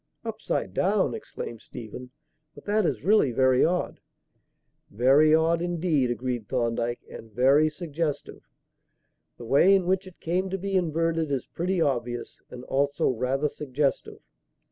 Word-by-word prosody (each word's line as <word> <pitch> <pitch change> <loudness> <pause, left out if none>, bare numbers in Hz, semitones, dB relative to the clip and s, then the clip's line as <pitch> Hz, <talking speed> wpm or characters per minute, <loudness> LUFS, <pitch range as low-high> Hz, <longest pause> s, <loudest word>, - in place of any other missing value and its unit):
"Upside - - -3
down!" - - +1
exclaimed 115 -2 -7
Stephen. 125 +2 -9 0.5
"But - - -14
that 210 -2 +1
is - - -3
really 200 -9 +4
very 130 +1 +3
odd." 180 +2 0 0.9
"Very 135 +8 +4
odd 165 +1 +2
indeed," 170 -6 0
agreed 120 -2 -3
Thorndyke, 120 -1 -1
"and 110 - -11
very 135 +6 +4
suggestive. 155 -2 -4 1.0
The 120 - -9
way 155 +11 +5
in 190 -2 +1
which 190 +1 0
it 185 - -14
came 180 +3 -1
to 195 - -2
be 195 +1 -3
inverted 165 -2 0
is 135 -3 -2
pretty 180 +2 -2
obvious 120 -4 -2
and 125 0 -9
also 140 +2 0
rather 130 +4 0
suggestive. 140 -1 -3
145 Hz, 140 wpm, -26 LUFS, 125-170 Hz, 1.0 s, way